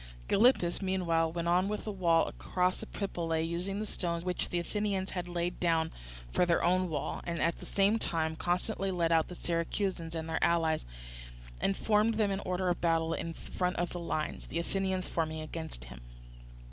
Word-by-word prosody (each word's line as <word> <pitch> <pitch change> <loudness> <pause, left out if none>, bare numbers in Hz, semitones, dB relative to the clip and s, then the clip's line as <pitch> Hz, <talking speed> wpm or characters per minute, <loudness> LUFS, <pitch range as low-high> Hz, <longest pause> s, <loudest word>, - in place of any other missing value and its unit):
Gylippus, 205 -7 +4
meanwhile, 170 -4 +1
went 170 0 -2
on 180 +2 +3
with 210 +1 -2
the 215 - -3
wall 170 -4 +3
across 180 0 0
Epipolae, 165 -5 -2
using 180 +4 -2
the 215 - -2
stones 170 -4 -2
which 180 -1 -1
the 175 - -1
Athenians 195 +1 -1
had 180 -1 -3
laid 175 0 -2
down 165 -2 +2 0.4
for - - +3
their 175 -1 +3
own 185 +1 +3
wall, 150 -3 -2
and 170 -1 -3
at 170 - +1
the - - -9
same 200 +3 +3
time 160 -4 0
constantly 180 +4 -1
led 170 -3 +1
out 160 -1 +4
the 180 - -8
Syracusans 170 0 -1
and 160 0 -3
their 160 0 -1
allies, 165 -2 +2 0.7
and 195 - +1
formed 215 +1 +3
them 210 -2 +2
in 195 - -1
order 185 -1 -1
of 175 - -1
battle 165 -1 +2
in 165 0 -3
front 180 0 -2
of 175 0 -1
the 175 - -4
lines, 155 -2 -3
the - - -4
Athenians 190 +2 -1
forming 160 -1 -1
against 155 - -6
him. - - -10
175 Hz, 185 wpm, -32 LUFS, 165-190 Hz, 0.7 s, Gylippus